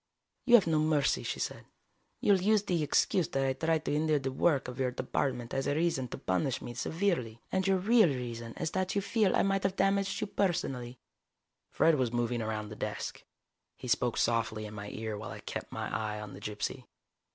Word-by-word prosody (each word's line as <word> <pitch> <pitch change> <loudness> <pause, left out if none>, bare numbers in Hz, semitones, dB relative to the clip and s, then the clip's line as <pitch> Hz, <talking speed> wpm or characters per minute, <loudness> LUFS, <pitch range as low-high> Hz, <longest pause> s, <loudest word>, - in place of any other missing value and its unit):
"You 240 -2 +7
have 220 - +6
no 160 -2 +2
mercy," 155 -2 +2
she - - -4
said. - - -4 0.6
"You 205 - +5
will 190 - +2
use 210 +1 +3
the 175 -5 0
excuse 155 +3 +2
that 135 0 0
I 135 - +1
tried 160 +3 0
to - - 0
hinder 155 0 +2
the 135 -1 -2
work 140 0 +2
of 125 +1 -7
your 130 -1 +2
department 125 -1 -2
as 135 0 -1
a 145 - +1
reason 160 -5 +1
to - - -6
punish 110 +8 0
me 120 - -7
severely 125 - -1
and 190 0 +1
your 195 -1 +4
real 215 +2 +5
reason 120 -3 -4
is 160 -2 -2
that 185 +1 -1
you 200 - +2
feel 200 0 +2
I - - +3
might 195 0 +1
have 195 0 0
damaged 195 0 +1
you - - -1
personally." 135 -12 -1 0.7
Fred 160 -3 +3
was 125 -3 +1
moving 120 0 0
around 110 -1 -3
the 105 - -8
desk. - - -4 0.5
He - - -8
spoke 120 0 +1
softly 115 -2 0
in 105 - -8
my 105 -1 -6
ear 110 0 -4
while 110 - -6
I - - -7
kept - - -6
my - - -3
eye 105 0 -2
on 105 -2 -8
the - - -10
gypsy. 105 0 -4
135 Hz, 215 wpm, -31 LUFS, 115-185 Hz, 0.7 s, You